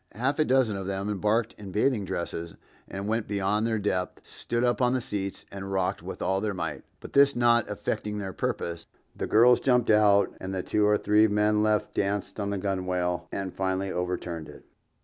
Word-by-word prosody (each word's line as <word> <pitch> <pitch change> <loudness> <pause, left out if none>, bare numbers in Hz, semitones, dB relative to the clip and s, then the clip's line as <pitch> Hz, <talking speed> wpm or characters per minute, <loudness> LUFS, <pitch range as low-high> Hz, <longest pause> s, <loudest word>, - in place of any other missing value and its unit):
Half 130 +7 -1
a 155 - +4
dozen 130 -6 +2
of 95 -1 -5
them 100 +1 -2
embarked 105 +3 0
in 100 -2 -8
bathing 105 +1 +1
dresses 85 -1 -4 0.3
and 100 +1 -5
when 110 +2 +1
beyond 105 +1 0
their 110 -1 0
depth 95 -3 -2
stood 120 +1 -3
up 120 +1 +1
on 125 0 +3
the 130 - +1
seats 100 -4 -4
and 95 0 -6
rocked 95 -1 -1
with - - -6
all 95 +1 +1
their 105 -2 -2
might; 90 - -4 0.2
but - - -10
this 140 0 +5
not 120 -1 +3
effecting 105 0 -3
their 95 -2 -4
purpose, 85 -1 -3 0.3
the - - -3
girls 120 +3 +6
jumped 125 -3 +3
out 100 -2 +4
and 95 0 -4
the 90 - -2
two 105 -1 +2
or 105 0 +4
three 105 +2 +4
men 105 0 +2
left 105 -1 +1
danced 100 0 -2
on 100 -1 -2
the 100 - -1
gunwale 90 -2 -2
and 95 -2 -4
finally 95 0 -1
overturned 90 -2 -3
it. - - -13
105 Hz, 200 wpm, -27 LUFS, 95-110 Hz, 0.3 s, girls